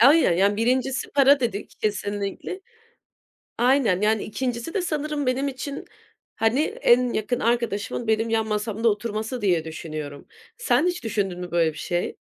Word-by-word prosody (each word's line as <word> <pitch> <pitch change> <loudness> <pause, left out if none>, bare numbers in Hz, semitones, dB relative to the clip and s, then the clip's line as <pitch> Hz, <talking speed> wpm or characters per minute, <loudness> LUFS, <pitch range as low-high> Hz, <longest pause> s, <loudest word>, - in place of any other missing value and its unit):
Ay 285 +7 +7
ya, 175 - +3
yani 200 +4 +2
1'incisi 260 +3 0
para 280 0 +5
dedik 225 -5 -3
kesinlikle. 205 - -3 1.0
Aynen. 245 -6 +3
Yani, 215 0 +2
2'ncisi 245 +5 -3
de 395 - 0
sanırım 300 -3 -2
benim 255 +2 0
için, 275 +1 -5 0.5
hani, 225 +5 +2
en 250 -4 +2
yakın 235 +3 -1
arkadaşımın 235 -1 -1
benim 220 +1 +1
yan 225 -1 +1
masamda 215 +2 0
oturması 220 +3 -3
diye 175 -5 +2
düşünüyorum. 155 -3 -7 0.3
Sen 460 -7 +2
hiç 355 -5 -2
düşündün 200 -5 -2
mü 180 -1 -6
böyle 165 -2 +2
bir - - -12
şey? 175 -1 -2
225 Hz, 150 wpm, -24 LUFS, 205-260 Hz, 1.0 s, Ay